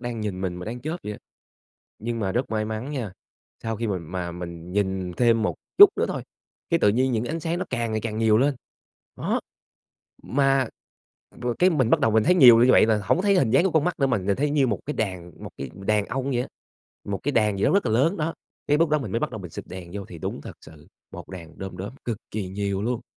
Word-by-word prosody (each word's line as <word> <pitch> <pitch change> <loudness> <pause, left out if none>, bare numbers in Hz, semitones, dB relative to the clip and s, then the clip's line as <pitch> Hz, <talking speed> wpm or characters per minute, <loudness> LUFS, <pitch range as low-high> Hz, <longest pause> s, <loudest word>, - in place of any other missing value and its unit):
đang 120 -2 -4
nhìn 100 -3 -3
mình 90 -2 -2
mà 90 - -7
đang 120 +3 -5
chớp 155 +6 -3
vậy 105 - -4
á. - - -9 0.8
Nhưng 115 +1 -3
mà 95 -2 -1
rất 125 +2 -1
may 110 -1 0
mắn 110 +6 -4
nha, 120 -10 -4 0.5
sau 115 -1 -2
khi 115 - -2
mà 90 -2 -3
mình 85 0 -8
nhìn 95 -2 -1
thêm 115 -2 +3
một - - 0 0.2
chút 405 - +12
nữa - - +2
thôi, - - -3 0.5
cái 170 - +3
tự - - +5
nhiên 125 +5 +2
những 115 0 0
ánh 160 +6 -3
sáng 170 +1 -2
nó 185 - -2
càng 120 -3 -1
ngày 110 - 0
càng 110 0 -4
nhiều 110 -1 +4
lên, 140 +3 +2 0.6
đó. - - -1 0.8
Mà 135 -1 +2 0.7
rồi 120 -1 -1
cái 185 +1 +6
mình 130 -9 +1
bắt - - +5
đầu 115 - +2
mình 110 0 +4
thấy 180 - +4
nhiều 125 -8 +9
như 130 - +5
vậy - - +6
là 110 -1 +2
hổng 95 - +2
có - - 0
thấy 200 -1 +4
hình 125 - +2
dáng - - +5
của 190 - +2
con 160 -2 +3
mắt 180 0 -1
nữa 135 - +3
mà 120 - +2
nhìn 100 +1 0
thấy 145 +2 +1
như 140 -3 +3
một 105 -6 -1
cái 150 - -3
đàn 90 -5 -3
một - - -6
cái 70 -1 -5
đàn 105 +1 0
ong 130 +4 -3
vậy 125 -1 +1
á - - -5 0.6
một 100 -1 -3
cái 145 - -1
đàn 105 -4 +2
gì - - +1
đó - - +3
rất 200 - +2
là 110 - +1
lớn 145 - +3
đó. 160 +1 -2 0.3
Cái 145 - +3
lúc 165 -1 +3
đó 155 - +3
mình 115 -9 -5
mới 115 - 0
bắt - - -1
đầu 110 - -6
mình 90 -3 -8
xịt - - -7
đèn 90 -2 -8
vô 100 -1 -4
thì 85 - -10
đúng - - -4
thật - - -8
sự, 80 -1 -16 0.2
một - - -9
đàn 85 -3 -10
đóm 95 -2 -6
đóm 95 +4 -6
cực 115 -3 -3
kỳ 100 -3 -3
nhiều 100 0 -2
luôn. 120 +1 -2
110 Hz, 265 wpm, -25 LUFS, 95-135 Hz, 0.8 s, chút